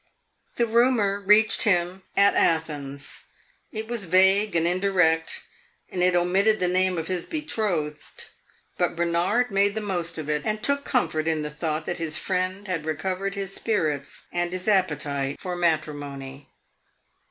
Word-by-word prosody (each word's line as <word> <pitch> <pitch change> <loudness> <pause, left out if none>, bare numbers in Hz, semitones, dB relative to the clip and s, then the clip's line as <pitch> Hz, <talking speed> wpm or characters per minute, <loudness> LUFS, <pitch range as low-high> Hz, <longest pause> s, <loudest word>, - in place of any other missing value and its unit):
The 235 - +2
rumor 230 -3 +3
reached 210 +3 +4
him 180 -2 +1 0.2
at 200 0 +6
Athens; 145 -4 -1 0.5
it 220 0 -5
was 235 -4 -3
vague 190 +3 +4
and 165 0 +2
indirect, 180 -3 +2 0.5
and 180 - -2
it 180 0 +3
omitted 195 +5 +3
the 180 - +1
name 185 0 +1
of 165 0 -3
his 180 -2 -3
betrothed. 190 - -3 0.5
But 175 -1 +1
Bernard 170 +8 +1
made 200 +1 +2
the - - -1
most 175 -5 -2
of 155 -2 -5
it, 150 -1 0
and 215 0 -2
took 280 0 +2
comfort 160 -11 0
in 160 -2 0
the 150 - -4
thought 155 0 -3
that 175 - -3
his 160 -1 -1
friend 185 +2 -2
had 175 -4 -2
recovered 185 +6 -2
his 195 -1 -4
spirits 155 -12 -2
and 175 0 -1
his 185 +1 -4
appetite 150 -8 0
for 180 -1 -4
matrimony. 145 -5 -2
180 Hz, 155 wpm, -25 LUFS, 160-200 Hz, 0.5 s, at